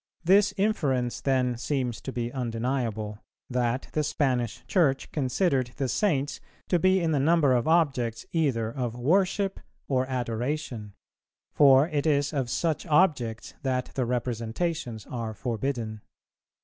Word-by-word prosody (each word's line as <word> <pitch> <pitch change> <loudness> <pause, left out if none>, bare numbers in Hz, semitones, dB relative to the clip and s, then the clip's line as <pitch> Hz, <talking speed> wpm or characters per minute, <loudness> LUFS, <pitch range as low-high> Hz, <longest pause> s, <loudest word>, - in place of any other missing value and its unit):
This 195 +4 +5
inference 140 - 0
then 130 -3 +1
seems 125 -2 -2
to 135 - -5
be 120 -1 -3
undeniable, 115 -4 -2 0.3
that 125 +1 0
the 155 - +1
Spanish 125 -6 -1
Church 145 -8 +1
considered 130 -2 0
the 135 -2 0
Saints 145 - 0 0.3
to 175 - +3
be 185 +2 +4
in 165 -2 0
the 145 - +2
number 150 -1 +4
of 125 +3 +1
objects 135 -9 +1
either 130 -9 0
of 120 -3 -3
"worship 190 +8 +1 0.3
or 130 -1 +1
adoration;" 120 -3 -3 0.6
for 135 0 +6
it 150 -3 -1
is 145 -1 +2
of 135 -4 -1
such 160 +6 -1
objects 150 -9 +1
that 130 -2 -1
the 130 -3 -1
representations 120 +1 -2
are 115 -3 -5
forbidden. 115 -2 -3
130 Hz, 135 wpm, -27 LUFS, 120-155 Hz, 0.6 s, for